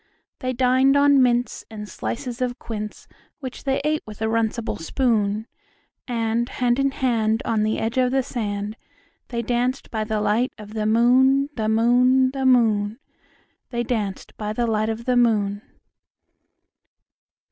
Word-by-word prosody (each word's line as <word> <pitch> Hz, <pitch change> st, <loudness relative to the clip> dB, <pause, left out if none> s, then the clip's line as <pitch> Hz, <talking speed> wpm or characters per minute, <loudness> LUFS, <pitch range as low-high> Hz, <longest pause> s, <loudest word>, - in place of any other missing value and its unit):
They 255 Hz, -1 st, -2 dB
dined 260 Hz, +2 st, +3 dB
on 285 Hz, -1 st, +5 dB
mince 245 Hz, -1 st, +1 dB
and 210 Hz, -2 st, -7 dB
slices 250 Hz, +3 st, -5 dB
of 250 Hz, 0 st, -1 dB
quince, 215 Hz, -3 st, -7 dB, 0.3 s
Which 260 Hz, -2 st, -8 dB
they 270 Hz, 0 st, +1 dB
ate 305 Hz, 0 st, +1 dB
with 210 Hz, -1 st, -10 dB
a 220 Hz, -, -1 dB
runcible 225 Hz, +1 st, -1 dB
spoon; 215 Hz, -, 0 dB, 0.6 s
And 235 Hz, 0 st, -1 dB
hand 245 Hz, 0 st, 0 dB
in 275 Hz, 0 st, +3 dB
hand, 230 Hz, -4 st, 0 dB
on 220 Hz, -2 st, +1 dB
the 215 Hz, +1 st, 0 dB
edge 225 Hz, +3 st, -1 dB
of 250 Hz, -1 st, +3 dB
the 265 Hz, +1 st, +1 dB
sand, 210 Hz, -4 st, -4 dB, 0.5 s
They 235 Hz, -1 st, -3 dB
danced 245 Hz, +3 st, -1 dB
by 220 Hz, -1 st, -2 dB
the 215 Hz, -1 st, -1 dB
light 215 Hz, +4 st, +1 dB
of 210 Hz, 0 st, -11 dB
the 215 Hz, -1 st, -1 dB
moon, 260 Hz, +5 st, +4 dB
The 215 Hz, -2 st, -1 dB
moon, 250 Hz, +3 st, +4 dB
The 265 Hz, -1 st, -1 dB
moon, 220 Hz, -4 st, +3 dB, 0.7 s
They 240 Hz, -1 st, -2 dB
danced 215 Hz, -5 st, -3 dB
by 210 Hz, 0 st, -3 dB
the 240 Hz, +2 st, 0 dB
light 215 Hz, -1 st, 0 dB
of 225 Hz, +1 st, -4 dB
the 250 Hz, -, +2 dB
moon. 210 Hz, -4 st, +2 dB
235 Hz, 155 wpm, -23 LUFS, 215-255 Hz, 0.7 s, on